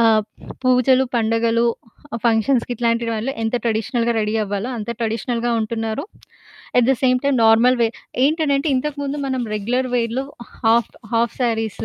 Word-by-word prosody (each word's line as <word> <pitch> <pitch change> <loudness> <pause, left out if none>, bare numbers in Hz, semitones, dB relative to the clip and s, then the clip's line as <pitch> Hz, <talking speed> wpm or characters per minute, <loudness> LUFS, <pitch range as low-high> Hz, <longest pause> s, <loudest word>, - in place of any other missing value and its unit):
ఆహ్, 220 -2 +4 0.4
పూజలు, 255 +1 +4
పండుగలు, 230 +1 +2 0.6
ఫంక్షన్స్‌కి 235 +2 +2
ఇట్లాంటి 235 0 0
వాటిలో 225 +4 -2
ఎంత 225 +2 0
ట్రెడిషనల్‌గా 230 +1 0
రెడీ 210 +1 -1
అవ్వాలో 205 +3 -3
అంత 220 0 -5
ట్రెడిషనల్‌గా 230 +1 -1
ఉంటున్నారు. 225 +4 -3 0.7
At 240 - +4
the - - +6
same 255 -1 +4
time 280 -1 +2
normal 230 +3 +5
wear 230 0 +1 0.3
ఏంటనంటే 295 -1 +1
ఇంతకుముందు 285 +1 -3
మనం 260 -1 -1
రెగ్యులర్ 245 +5 -1
వేర్‌లో 240 +2 0 0.4
హాఫ్ 225 0 +3 0.2
హాఫ్ 230 -1 +1
సారీస్ 225 -3 -1
235 Hz, 135 wpm, -20 LUFS, 225-255 Hz, 0.7 s, the